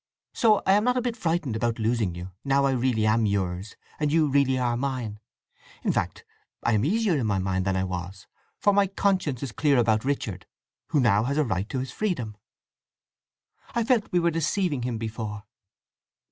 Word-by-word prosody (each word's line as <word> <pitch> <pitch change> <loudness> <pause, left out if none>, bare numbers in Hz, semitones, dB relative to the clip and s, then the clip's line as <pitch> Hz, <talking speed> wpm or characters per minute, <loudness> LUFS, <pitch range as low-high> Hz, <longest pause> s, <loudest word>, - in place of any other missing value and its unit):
So 215 -3 +3
I - - +4
am 205 +1 +4
not 250 0 +2
a - - +2
bit 240 -2 -1
frightened 165 - -1
about 115 +1 0
losing 110 -5 0
you, 90 +2 -7
now 140 0 +2
I 135 - +3
really 125 -4 +1
am 110 0 +3
yours 95 0 -2 0.2
and 150 -1 +1
you 160 -1 +3
really 135 -2 +2
are 120 -2 +1
mine. 125 -5 -3 0.6
In - - +2
fact, - - -2 0.4
I 120 - +2
am 105 - +2
easier 205 - +2
in 115 - -1
my 100 -2 +1
mind 95 0 -1
than 95 -1 +1
I 95 - +1
was, 95 +1 -5 0.3
for 205 - +3
my 200 0 +4
conscience 185 -9 0
is 135 - -4
clear 145 +2 +2
about 110 -2 +3
Richard, 110 -9 -3 0.4
who 150 - +1
now 110 -4 +3
has 140 +3 -1
a 155 - +4
right 100 -4 -2
to 135 - -3
his 130 0 -3
freedom. 125 - -2 1.4
I 235 - +2
felt 230 -2 +1
we 180 - +3
were 170 0 +2
deceiving 165 -2 0
him 120 -1 -2
before." 110 -2 -5
125 Hz, 195 wpm, -26 LUFS, 105-160 Hz, 1.4 s, I